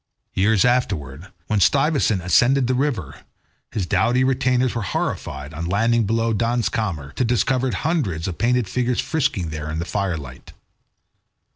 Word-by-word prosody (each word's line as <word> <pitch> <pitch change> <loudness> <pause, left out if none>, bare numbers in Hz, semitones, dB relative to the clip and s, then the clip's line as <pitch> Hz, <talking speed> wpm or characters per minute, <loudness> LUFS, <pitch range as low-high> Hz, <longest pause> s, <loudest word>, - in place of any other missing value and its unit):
Years 100 +2 +3
afterwards, 95 - -1 0.2
when 105 +2 0
Stuyvesant 135 - +2
ascended 125 +10 +3
the 130 - +1
river, 125 - -2 0.5
his 100 -5 -2
doughty 120 +7 +2
retainers 130 -1 +1
were 115 - -2
horrified, 70 -6 -3
on 80 +2 -4
landing 115 +3 +2
below 115 +1 +1
the 110 - -1
Dans 120 0 +1
Kamer, 80 -11 -3
to - - -1
discover 125 +2 +1
hundreds 115 - -1
of 90 - -5
painted 125 -1 +2
figures 125 +4 -1
frisking 110 - -1
there 75 0 -5
in 75 - -3
the 85 - -2
fire 95 -3 -1
light. 65 -4 -11
110 Hz, 155 wpm, -22 LUFS, 85-125 Hz, 0.5 s, Years